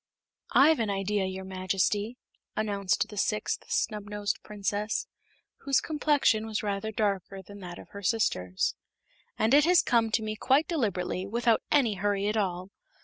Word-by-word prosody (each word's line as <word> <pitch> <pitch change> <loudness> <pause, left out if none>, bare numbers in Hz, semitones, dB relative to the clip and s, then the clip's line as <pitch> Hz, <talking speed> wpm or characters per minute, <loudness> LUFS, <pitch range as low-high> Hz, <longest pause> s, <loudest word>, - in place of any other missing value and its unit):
"I've 310 +1 +6
an 225 -2 0
idea, 195 0 0
your 190 0 -5
Majesty," 190 +4 -1 0.4
announced 200 -3 0
the 210 - -10
sixth 210 +1 -1
Snubnosed 210 -1 -2
Princess, 210 +1 -2 0.5
whose 275 -2 +2
complexion 290 -8 +1
was 220 0 -2
rather 205 +1 -2
darker 195 -2 -2
than 200 +2 -12
that 175 -2 -8
of - - -12
her 200 - -9
sisters, 95 - 0 0.6
"and 220 +4 +2
it 295 +1 +7
has 355 0 +5
come 230 -2 +2
to 220 - +2
me 215 0 -3
quite 270 +7 +2
deliberately, 195 - -1
without 230 +1 +2
any 260 -7 +3
hurry 200 0 0
at 210 - 0
all. 185 -2 -2
210 Hz, 150 wpm, -28 LUFS, 195-225 Hz, 0.6 s, it